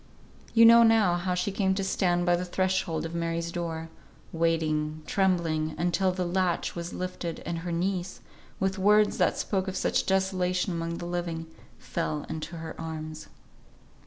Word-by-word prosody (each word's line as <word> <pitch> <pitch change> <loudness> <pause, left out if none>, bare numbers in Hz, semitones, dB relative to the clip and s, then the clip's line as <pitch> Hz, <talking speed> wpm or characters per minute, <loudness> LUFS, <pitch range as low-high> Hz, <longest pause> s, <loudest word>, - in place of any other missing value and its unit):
You 230 0 +8
know 230 +1 +9
now 225 -5 +5
how 180 +1 -1
she 180 +3 -1
came 190 -1 +1
to 195 - -1
stand 175 -2 +1
by 175 -1 +4
the 175 - -2
threshold 185 -2 -1
of 165 - -6
Mary's 170 0 -2
door, 165 -2 -4 0.4
waiting, 155 -2 0
trembling, 165 -5 +1
until 180 +2 +1
the 180 0 -2
latch 180 0 0
was 170 0 -5
lifted, 180 -2 -4
and 170 -1 -3
her 175 +1 -5
niece, 180 +2 -2 0.4
with 190 +1 0
words 210 +2 +4
that - - +2
spoke 190 -2 -1
of 190 0 -3
such - - 0
desolation 185 -1 +1
among 170 0 -3
the 175 - -6
living, 175 -2 -3 0.3
fell 155 -3 -3
into 160 +1 -5
her 160 0 -6
arms. 155 -1 -6
175 Hz, 160 wpm, -28 LUFS, 165-190 Hz, 0.4 s, know